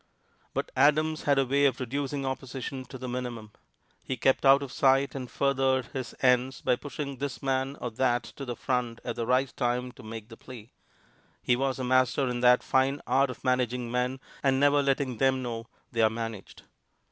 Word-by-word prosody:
But - - -2
Adams 155 +3 +3
had 140 -1 +3
a 135 - +3
way 140 +2 +2
of 130 -3 +2
reducing 140 +2 -3
opposition 130 0 -5
to 130 - -9
the 130 0 -6
minimum. 120 -3 -5 0.5
He 130 - -3
kept 135 +2 +2
out 140 +1 +6
of 135 - -7
sight 135 -1 +3
and 130 -3 -6
furthered 135 -2 +1
his 130 -3 -5
ends 125 0 +3
by - - +2
pushing 140 -1 -6
this 140 0 -5
man 135 +1 -1
or 120 - -4
that 120 +1 +1
to 140 - -9
the 120 -3 -4
front 120 -2 -2
at 120 - -4
the 115 - -3
right 130 +1 +1
time 125 0 -1
to 130 - -15
make 110 -1 -8
the 115 - -11
plea. 120 -3 -12 0.7
He 125 - +3
was 135 +1 -1
a 130 - -4
master 130 +1 +2
in 120 0 -2
that 125 0 +5
fine 135 +2 +2
art 135 +1 +3
of 125 - -8
managing 125 -2 0
men 125 +1 -1 0.2
and 135 -1 +2
never 145 +1 +4
letting 135 -3 0
them 130 +1 +2
know 115 -1 -5 0.2
they 115 - 0
are 110 - +5
managed. 115 -3 -6
130 Hz, 195 wpm, -28 LUFS, 125-135 Hz, 0.7 s, out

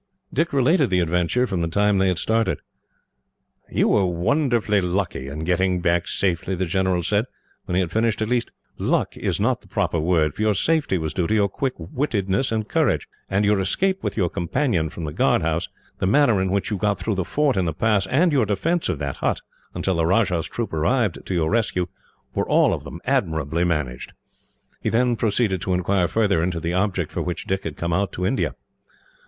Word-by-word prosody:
Dick 165 +2 +1
related 140 +2 +3
the 90 - +2
adventure, 90 +8 +1
from 95 -7 -2
the 85 - 0
time 100 +3 +2
they 95 - +3
had 90 -2 +1
started. 115 +1 0 1.1
"You - - +2
were 100 -3 +3
wonderfully 110 - +1
lucky, 90 -6 -2
in 75 +3 -5
getting 90 +1 +1
back 85 -1 +1
safely," 90 0 -1
the 95 +1 -1
general 95 0 0
said, 105 +5 +1 0.4
when 90 - -2
he 95 - +3
had 85 -3 -2
finished. 110 +1 +1
"At 110 - 0
least, 120 0 0 0.3
luck - - 0
is - - -2
not - - +1
the - - -20
proper 85 - 0
word, 80 -2 +2
for - - -6
your 110 -1 +2
safety 155 - +1
was 80 -2 -3
due 90 -1 0
to 110 - +1
your 100 -2 +3
quick 130 +6 -2
wittedness 100 - -1
and 110 -1 -1
courage; - - +1 0.2
and 100 +2 +1
your 105 -1 +3
escape 190 - 0
with - - -3
your 95 -5 +2
companion 85 - 0
from 85 - -8
the 75 -1 -4
guard - - +2
house, 80 +1 -1 0.3
the 95 - 0
manner 115 -3 +4
in 95 - 0
which 100 +5 -1
you 105 - 0
got 105 +1 0
through 100 +4 -2
the 95 -1 -1
fort 145 - +1
in 95 -2 +1
the 80 - 0
pass, 100 +3 +1
and 160 - +3
your 130 -7 +2
defence 160 - 0
of 85 - -1
that 70 -1 -4
hut, - - -1 0.3
until 95 - 0
the 80 - +2
Rajah's 90 -3 +2
troop 115 -7 -4
arrived 100 +6 0
to 95 - -2
your 80 -2 +1
rescue, 105 -5 +1 0.5
were - - -1
all - - +4
of - - -4
them - - -9
admirably 80 +1 0
managed." 75 -8 -2 0.7
He - - 0
then 120 +1 +2
proceeded 105 -4 0
to 95 - 0
inquire 90 0 +1
further 100 -4 +2
into 85 0 -1
the 85 +1 -2
object 95 -3 0
for - - -3
which 90 -1 -4
Dick 95 0 -2
had 80 -2 -5
come 85 0 -2
out 95 +2 0
to 90 - -2
India. 130 +8 0
95 Hz, 210 wpm, -23 LUFS, 85-110 Hz, 1.1 s, manner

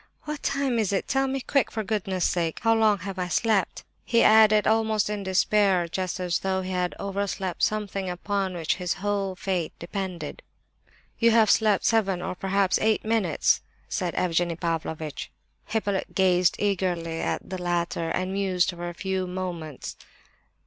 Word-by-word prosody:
"What 300 -1 -5
time 275 -4 0
is 210 -3 +1
it? 195 - -1
Tell 270 +1 +1
me, 265 0 -2
quick, 275 -1 +1
for 220 - -3
goodness' 195 -3 -1
sake! 165 -2 -1
How 225 0 +5
long 220 -2 +4
have 195 -1 -5
I 180 - -1
slept?" 205 +2 +1 0.2
he 235 -1 +3
added, 215 -1 +6
almost 220 -1 +2
in 210 -1 -3
despair, 190 -1 +2
just 185 +1 -3
as 180 -2 0
though 190 -1 -1
he 185 - -5
had 180 -1 -1
overslept 195 -2 -3
something 200 -3 -1
upon 190 +1 -2
which 170 -1 -1
his 180 -2 -1
whole 195 -1 -2
fate 185 -4 -2
depended. 185 0 -5 0.8
"You 230 - +5
have 225 -2 +5
slept 215 -3 +3
seven 195 -5 +2
or 185 - -3
perhaps 195 +1 +1
eight 220 -1 +2
minutes," 215 -8 +2 0.3
said - - -2
Evgenie 175 -1 +1
Pavlovitch. 160 -2 -3 0.4
Hippolyte 205 -3 -2
gazed 180 -2 +3
eagerly 175 -5 -1
at - - -2
the 185 -1 -5
latter, 170 -1 -1
and 185 +3 -2
mused 190 -2 +1
for 175 0 -5
a 175 - -9
few 190 0 -2
moments. 175 -6 -5
190 Hz, 165 wpm, -26 LUFS, 180-210 Hz, 0.8 s, added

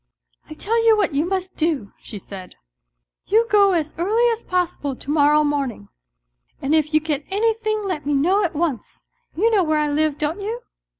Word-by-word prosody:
" - - -36
I 310 - -8
tell 455 +7 0
you 450 -1 +5
what 400 -7 0
you 295 +4 0
must 375 0 -3
do," 305 -11 -1
she 210 - -9
said, 190 -1 -10 0.7
"you 445 +3 +3
go 400 -2 +5
as 315 -3 -1
early 440 +7 +2
as 455 0 -3
possible 350 -6 -2
to 280 - -6
morrow 300 0 +4
morning, 280 - -2 0.7
and 275 +3 -1
if 310 -1 +2
you 310 - +4
get 305 -2 -3
anything 435 +1 0
let 365 -7 -3
me 290 - +1
know 365 +9 +2
at 340 -4 -2
once. 295 -8 -3 0.3
You 440 +8 +2
know 410 -4 +3
where 310 -2 +1
I 300 -1 +1
live, 305 0 0
don't 310 +6 -2
you 455 +4 -4
320 Hz, 195 wpm, -21 LUFS, 290-405 Hz, 0.7 s, you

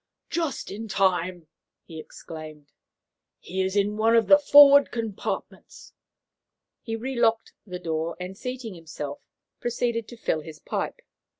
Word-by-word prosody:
"Just 330 -5 -2
in 220 +3 -6
time!" 185 -3 0 0.4
he 160 -2 -10
exclaimed. 155 -2 -10 0.7
"He 190 +2 -4
is 190 +1 -1
in 205 +1 +1
one 225 +1 +3
of 230 -1 +4
the 290 - +7
forward 285 -1 +8
compartments." 225 -4 -6 0.9
He 225 -2 -4
relocked 230 -1 0
the 180 -1 -5
door, 165 -1 -3
and, 180 +1 -6
seating 250 -1 -6
himself, 155 -4 -7 0.4
proceeded 235 -1 -1
to 240 - -11
fill 160 -8 -1
his 155 0 -10
pipe. - - -4
200 Hz, 130 wpm, -25 LUFS, 165-235 Hz, 0.9 s, forward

